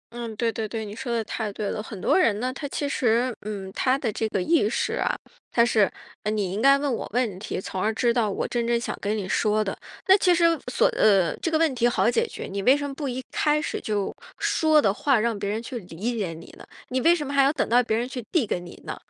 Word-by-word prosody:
嗯， 235 -2 -5
对 230 +1 0
对 220 0 -3
对， 220 +1 -4
你 205 +1 -8
说 250 -1 -5
得 230 -1 0
太 215 0 -4
对 205 0 -3
了， 210 - -3
很 210 -3 -8
多 - - +2
人 210 - +3
呢， 255 +2 -2
他 285 +1 -5
其 285 +1 -3
实， 240 -2 +1
嗯， 200 -2 -6
他 260 +1 +2
的 235 -6 -2
这 220 +1 -1
个 195 - -1
意 310 -11 +3
识 - - -1
啊， - - 0 0.4
他 235 - +4
是， 215 -5 +3 0.3
呃， 210 - -2
你 205 -4 -1
应 205 +4 -2
该 275 +1 +6
问 280 -2 -1
我 - - -4
问 225 -7 0
题， 195 - -4
从 190 0 -5
而 220 - +2
知 240 -1 +2
道 230 -3 +1
我 - - -2
真 235 -1 -1
正 235 0 +2
想 - - -4
跟 210 +2 -1
你 195 - -4
说 215 +2 +1
的， 195 - -3 0.3
那 380 - +8
其 360 -2 +4
实 340 - +2 0.3
所 - - +3
呃， 195 -5 +3
这 330 - -2
个 315 - +2
问 320 -4 +2
题 240 -1 +2
好 240 0 +2
解 460 - +1
决， - - -8
你 200 +1 -4
为 260 +7 +5
什 285 0 -3
么 275 - -6
不 280 -1 -4
一 255 +1 -4
开 300 0 +2
始 - - -3
就 205 -2 -2 0.2
说 310 -1 +3
的 200 -8 +3
话 275 -2 +2
让 230 -1 0
别 200 0 -2
人 220 +2 -2
去 240 0 -5
理 200 +6 -4
解 195 -7 -2
你 165 +1 -12
呢？ - - -11 0.3
你 255 0 0
为 335 +4 +5
什 300 -4 -3
么 280 - -5
还 275 - +5
要 275 - +4
等 310 - -1
到 245 +2 +5
别 220 -2 0
人 240 +2 -1
去 250 -3 -6
递 320 -10 +2
给 180 - -2
你 175 -1 -11
呢？ - - -4
235 Hz, 295 characters per minute, -25 LUFS, 210-270 Hz, 0.4 s, 那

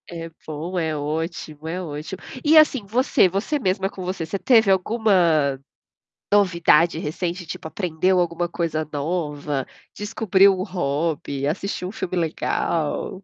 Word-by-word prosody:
É 165 -1 -6 0.2
bom, 160 +4 -5
é 160 -2 -1
ótimo, 155 +1 -4
é 180 +3 -3
ótimo. 155 +2 -6 0.2
E, 310 +1 +6
assim, 275 -8 +5
você 225 -2 +3
você 200 - -1
mesma 190 -3 0
com 190 - -8
você, 180 -2 -3
você 180 +5 -3
teve 225 -4 +4
alguma, 180 - +2 0.7
novidade 170 -5 +4
recente 175 +3 -3
tipo 160 - -6
aprendeu 180 +1 0
alguma 175 0 0
coisa 160 -3 -2
nova, 150 -3 -2 0.3
descobriu 200 -2 +3
um - - -1
hobby, 150 -6 -2
assistiu 180 +4 -3
um - - -6
filme 185 -4 -4
legal? 165 +2 -1
175 Hz, 135 wpm, -23 LUFS, 155-190 Hz, 0.7 s, E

